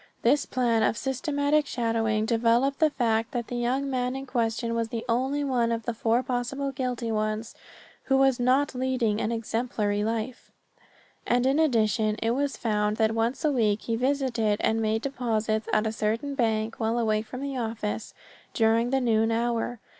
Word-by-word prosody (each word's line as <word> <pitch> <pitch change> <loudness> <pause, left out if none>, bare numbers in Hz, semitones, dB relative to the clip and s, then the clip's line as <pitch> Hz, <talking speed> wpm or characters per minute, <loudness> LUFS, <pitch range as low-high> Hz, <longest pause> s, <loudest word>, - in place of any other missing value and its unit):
This 275 +5 +3
plan 240 -3 +1
of 220 - +2
systematic 285 +3 0
shadowing 225 -3 0
developed 235 +4 +2
the 315 - +5
fact 225 -5 0
that 240 -2 -3
the 245 - -4
young 250 +3 0
man 255 -1 -1
in 270 0 -5
question 230 -2 -1
was 230 -1 0
the 230 0 -4
only 265 +5 0
one 245 -4 +1
of 230 0 -2
the 235 - -1
four 230 +2 +1
possible 260 +3 -2
guilty 250 -3 -3
ones 215 +1 -2 0.5
who 270 - +3
was 270 -2 +3
not 260 +3 +2
leading 250 -4 0
an 220 - -1
exemplary 225 -2 -1
life, 230 +3 -3 0.8
and 245 +1 +2
in 270 +3 +3
addition 220 -7 +2
it 225 +1 -1
was 280 +3 -1
found 210 -2 0
that 220 -1 +2
once 230 +7 -1
a 300 - +3
week 215 -5 +1
he 230 - -1
visited 245 -4 0
and 225 0 +1
made 220 +1 0
deposits 225 -5 -1
at 215 - +2
a 220 - 0
certain 225 +6 -2
bank 225 -3 0
while 225 +1 0
away 215 -2 +1
from 250 +4 -8
the 280 -1 -4
office 225 -3 -4 0.4
during 225 +1 +3
the 265 +1 +1
noon 225 -2 +2
hour. 235 +1 -1
235 Hz, 175 wpm, -26 LUFS, 225-260 Hz, 0.8 s, the